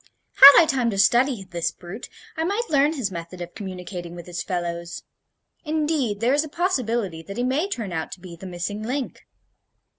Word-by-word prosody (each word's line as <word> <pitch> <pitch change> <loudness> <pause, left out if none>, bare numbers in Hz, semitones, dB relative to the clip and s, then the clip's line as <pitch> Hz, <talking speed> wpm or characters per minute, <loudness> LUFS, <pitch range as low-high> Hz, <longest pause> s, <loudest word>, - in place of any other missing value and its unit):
Had 280 +1 +12
I 335 - +8
time 260 -6 +1
to 200 - -3
study 240 +2 +3
this 175 -3 -2
brute, 185 +6 -10 0.3
I 320 - -1
might 410 +5 -2
learn 290 +1 +3
his 250 -10 -3
method 170 +1 -7
of 175 0 -7
communicating 180 -3 -7
with 175 -1 -9
his 175 -1 -5
fellows. 170 -2 -4 0.6
Indeed, 300 - -1
there 245 +3 +3
is 290 +2 +3
a 310 - -8
possibility 240 - -1
that 195 +6 -9
he 245 - 0
may 280 +9 0
turn 220 - -4
out 160 -1 -4
to - - -11
be 175 -1 -10
the 190 +3 -10
missing 180 +4 -4
link." 255 +4 -4
210 Hz, 190 wpm, -23 LUFS, 175-280 Hz, 0.6 s, Had